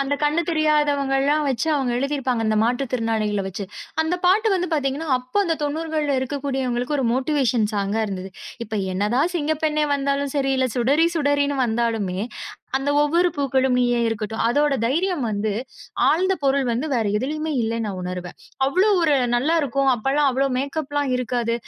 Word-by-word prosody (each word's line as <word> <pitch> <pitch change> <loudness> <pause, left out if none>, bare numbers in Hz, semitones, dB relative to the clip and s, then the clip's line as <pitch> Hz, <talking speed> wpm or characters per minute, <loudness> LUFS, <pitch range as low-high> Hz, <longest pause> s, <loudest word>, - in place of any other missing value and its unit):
அந்தக் 285 +2 -1
கண்ணு 300 +3 +2
தெரியாதவங்கல்லாம் 295 -2 +2
வச்சு 260 +3 -1
அவங்க 265 -4 0
எழுதி 275 +2 -1
இருப்பாங்க 250 -4 -1
அந்த 215 0 +1
மாற்றுத் 245 +2 -1
திறனாளிகள 220 -4 0
வச்சு. 195 +1 -5 0.4
அந்தப் 355 +3 -2
பாட்டு 425 +4 +4
வந்து 360 -1 -1
பாத்தீங்கன்னா, 290 +2 -2
அப்ப 255 +11 -1
அந்தத் 325 -4 -1
90கள்ல 305 -1 -1
இருக்கக்கூடியவங்களுக்கு 265 0 -2
ஒரு 265 - 0
மோட்டிவேஷன் 260 -4 +1
சாங்கா 200 +2 0
இருந்தது. 190 -1 -5 0.3
இப்ப 220 0 -7 0.2
என்னதான் 240 - +1
சிங்கப்பெண்ணே 305 -1 0
வந்தாலும் 280 0 -1
சரி, 270 -1 +1
இல்ல 260 - +2
சுடரி 280 +7 +3
சுடரின்னு 285 -2 +1
வந்தாலுமே, 225 -5 -1 0.6
அந்த 275 +2 -1
'ஒவ்வொரு 340 +4 +3
பூக்களும் 265 -2 +1
நீயே' 245 -1 +2
இருக்கட்டும். 220 0 -3
அதோட 290 +3 +2
தைரியம் 325 +2 0
வந்து, 210 0 -1 0.6
ஆழ்ந்த 375 +4 +2
பொருள் 275 -1 +2
வந்து 245 +7 -1
வேற 230 -4 +1
எதுலயுமே 305 +5 -3
இல்லன்னு 225 0 -2
நா 205 - -2
உணருவேன். 180 -1 -6 0.3
அவ்வளவு 370 +10 +3
ஒரு 300 - +4 0.2
நல்லா 290 +7 +1
இருக்கும். 275 0 +1
அப்பல்லாம் 275 +5 +1
அவ்வளவு 265 0 0
மேக்கப்லாம் 285 0 -2
இருக்காது. 240 -1 -1
275 Hz, 155 wpm, -22 LUFS, 235-295 Hz, 0.6 s, பாட்டு